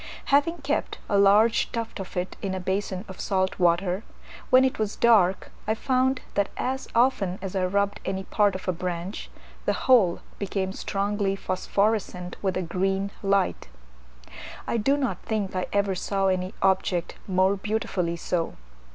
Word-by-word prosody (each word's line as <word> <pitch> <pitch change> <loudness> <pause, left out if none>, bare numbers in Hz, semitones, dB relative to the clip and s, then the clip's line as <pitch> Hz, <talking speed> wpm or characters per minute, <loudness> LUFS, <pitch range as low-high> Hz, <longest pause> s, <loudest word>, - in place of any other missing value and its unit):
Having 295 +3 +3
kept 285 +2 -1
a 205 - 0
large 205 +3 +5
tuft 230 -3 -4
of 190 0 -7
it 180 +1 -2
in 190 -1 -2
a - - -3
basin 190 +1 -2
of 190 - -10
salt 190 -1 0
water, 180 +2 +2 0.5
when 255 +1 +6
it 260 - -1
was 215 -1 -1
dark 200 -6 +3 0.2
I 220 - +2
found 260 +2 +1
that 200 -1 +1
as 265 +1 -2
often 230 -7 +2
as 195 0 -6
I 185 -1 +1
rubbed 200 +2 0
any 190 0 -3
part 205 0 +2
of 185 - -7
a - - +3
branch, 180 +2 -4 0.4
the - - +2
whole 220 -10 +5 0.2
became 190 -1 -2
strongly 200 0 -1
phosphorescent 190 -1 -1
with 190 -2 0
a 185 - -1
green 195 +3 -1
light: 195 - +1 1.0
I - - 0
do 270 +6 +2
not 270 -4 -2
think 210 -4 -2
I 185 - -1
ever 200 -1 +1
saw 195 +1 0
any 185 +2 -1
object 190 -2 +1
more 190 +1 +3
beautifully 195 -4 -1
so. 170 0 -2
195 Hz, 160 wpm, -26 LUFS, 185-215 Hz, 1.0 s, when